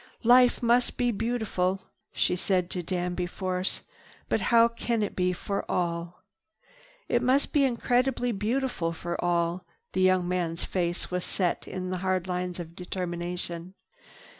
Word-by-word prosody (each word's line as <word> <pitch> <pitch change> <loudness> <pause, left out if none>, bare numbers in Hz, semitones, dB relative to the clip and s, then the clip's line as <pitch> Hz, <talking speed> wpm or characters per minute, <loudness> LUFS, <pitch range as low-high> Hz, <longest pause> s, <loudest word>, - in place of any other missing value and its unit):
"Life 245 +1 +6
must 240 +1 +3
be 245 -1 +2
beautiful," 210 -4 -1 0.3
she - - +1
said 180 -1 0
to 180 - -2
Danby 180 0 -2
Force, 185 0 -2 0.5
"but - - +1
how 230 0 +7
can 230 -1 -1
it 205 - -3
be, 180 0 +2
for 200 +3 -3
all?" 170 -1 -2 0.8
"It 240 - +2
must 260 +3 +2
be 285 -2 +5
increasingly 245 0 +1
beautiful 220 -4 -1
for 170 +1 -4
all." 175 0 +1 0.3
The 185 - +1
young 185 -1 +4
man's 175 -2 -1
face 175 -1 -1
set 180 0 -1
in 185 0 -4
hard 185 0 0
lines 180 -1 -3
of 170 -1 -7
determination. 175 0 -4
185 Hz, 140 wpm, -28 LUFS, 175-230 Hz, 0.8 s, how